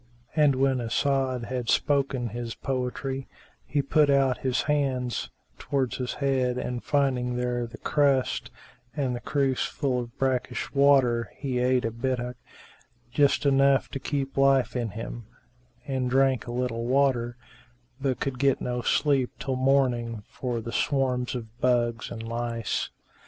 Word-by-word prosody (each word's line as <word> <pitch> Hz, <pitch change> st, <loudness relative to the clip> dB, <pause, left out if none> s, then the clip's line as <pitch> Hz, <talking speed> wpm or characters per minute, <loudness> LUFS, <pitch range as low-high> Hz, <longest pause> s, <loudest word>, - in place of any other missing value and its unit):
And 150 Hz, -3 st, +4 dB
when 130 Hz, -1 st, +2 dB
As'ad 130 Hz, +1 st, 0 dB
had 125 Hz, -2 st, -3 dB
spoken 135 Hz, -4 st, +1 dB
his 115 Hz, 0 st, -5 dB
poetry, 130 Hz, +1 st, -3 dB, 0.4 s
he 140 Hz, +2 st, 0 dB
put 150 Hz, +1 st, +3 dB
out 135 Hz, -4 st, +3 dB
his 125 Hz, +3 st, 0 dB
hand 135 Hz, -5 st, 0 dB, 0.3 s
towards 135 Hz, -3 st, -1 dB
his 125 Hz, -1 st, -3 dB
head 130 Hz, -3 st, +1 dB
and 125 Hz, -1 st, -3 dB
finding 130 Hz, -4 st, +1 dB
there 120 Hz, -1 st, -1 dB
the 115 Hz, 0 st, -11 dB
crust 140 Hz, -3 st, +1 dB, 0.5 s
and 130 Hz, -4 st, 0 dB
the -, -, -4 dB
cruse 135 Hz, -1 st, 0 dB
full 130 Hz, -4 st, -1 dB
of 120 Hz, -1 st, -7 dB
brackish 130 Hz, -2 st, -1 dB
water 135 Hz, -5 st, +4 dB
he 130 Hz, -3 st, -2 dB
ate 125 Hz, 0 st, +2 dB
a 115 Hz, -, -1 dB
bittock, 125 Hz, +1 st, -2 dB, 0.7 s
just 145 Hz, +2 st, +3 dB
enough 135 Hz, -1 st, +4 dB
to 135 Hz, -, -5 dB
keep 135 Hz, -1 st, -3 dB
life 135 Hz, -3 st, +3 dB
in 120 Hz, -2 st, -1 dB
him, 115 Hz, +2 st, -7 dB, 0.6 s
and 130 Hz, -2 st, -1 dB
drank 135 Hz, -1 st, +2 dB
a -, -, -4 dB
little 120 Hz, -1 st, -2 dB
water, 125 Hz, -3 st, +2 dB, 0.6 s
but 135 Hz, -2 st, 0 dB
could 130 Hz, -3 st, -3 dB
get 140 Hz, -1 st, +3 dB
no 125 Hz, 0 st, -2 dB
sleep 135 Hz, -1 st, +2 dB
till 135 Hz, -1 st, -2 dB
morning 125 Hz, -4 st, +1 dB
for 120 Hz, -3 st, -3 dB
the 115 Hz, -, -6 dB
swarms 130 Hz, -2 st, 0 dB
of 120 Hz, -2 st, -4 dB, 0.2 s
bugs[FN#383] 120 Hz, -2 st, +1 dB
and 115 Hz, -1 st, -6 dB
lice. 115 Hz, -2 st, -2 dB
130 Hz, 145 wpm, -27 LUFS, 120-135 Hz, 0.7 s, And